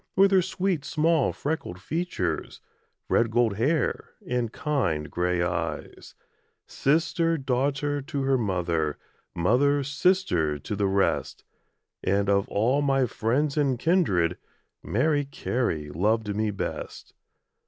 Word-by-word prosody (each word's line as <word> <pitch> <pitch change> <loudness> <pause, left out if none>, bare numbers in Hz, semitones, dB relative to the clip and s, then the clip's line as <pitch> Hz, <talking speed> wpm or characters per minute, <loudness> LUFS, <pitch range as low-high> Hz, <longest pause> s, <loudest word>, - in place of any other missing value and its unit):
With 195 +1 +5
her 190 -1 +5
sweet 185 -3 -1
small 160 -2 +2
freckled 145 - -4
features, 95 - -3 0.5
Red 115 - +2
gold 115 -3 +1
hair, 145 +8 0
and 120 -6 -1
kind 95 - -1
grey 90 0 0
eyes; 85 +1 -4 0.5
Sister, 165 +3 +1
daughter, 140 +2 -1
to 140 -1 -3
her 135 0 +2
mother, 85 - -1 0.4
Mother, 135 +11 +2
sister, 140 - +1
to 90 +8 -5
the 100 0 +1
rest 95 0 0 0.6
And 100 +1 +1
of 100 0 +1
all 125 +8 +2
my 135 -2 +2
friends 135 +6 0
and 140 -4 +2
kindred, 100 - +2 0.4
Mary 145 +5 +1
Carey 115 - -2
loved 105 +5 0
me 110 0 0
best. 100 - -5
125 Hz, 120 wpm, -26 LUFS, 100-150 Hz, 0.6 s, With